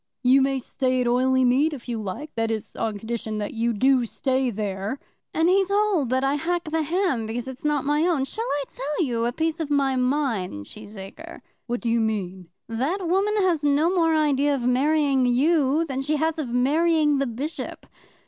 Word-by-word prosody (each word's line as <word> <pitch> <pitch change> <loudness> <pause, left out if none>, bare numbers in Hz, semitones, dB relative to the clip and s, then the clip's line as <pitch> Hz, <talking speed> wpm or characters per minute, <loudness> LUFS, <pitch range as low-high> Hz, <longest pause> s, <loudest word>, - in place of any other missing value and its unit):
"You 260 +2 +5
may 270 0 +1
stay 255 0 -1
at - - 0
Oileymead, 260 +4 +3
if 260 -4 -9
you 230 -2 -3
like; 215 +10 -6
that 225 0 -1
is, 220 -2 -4
on 220 -2 -2
condition 220 0 -4
that 205 -1 -4
you 235 +1 0
do 255 +2 +2
stay 260 +2 0
there." 205 +1 -3 0.3
"And 320 - +1
be 380 +3 +4
told 400 - +1
that 260 +1 +1
I 270 +1 +2
hack 340 +4 -1
the 320 0 +1
ham 315 - 0
because 235 +3 -4
it's 260 -1 -8
not 295 -2 0
my 295 +4 +2
own. 305 -7 +1
Shall 445 +11 -4
I 285 0 0
tell 295 +5 -2
you 235 -3 -1
a - - 0
piece 320 +4 -2
of 315 -3 -3
my 275 -2 +2
mind, 250 - -1
Cheesacre?" 215 - -10 0.3
"What 240 0 -2
do 235 - -1
you 230 0 +2
mean?" 190 -5 -2 0.2
"That 295 - -2
woman 390 +4 +1
has 340 -5 +1
no 295 +5 +3
more 330 -3 +3
idea 290 -2 +2
of 250 -3 -3
marrying 275 0 +2
you 290 +4 +2
than 270 -3 -3
she 295 +3 0
has 320 +1 0
of 280 -6 -3
marrying 295 +4 +2
the 275 - 0
Bishop. 270 +8 -5
270 Hz, 195 wpm, -24 LUFS, 235-310 Hz, 0.3 s, You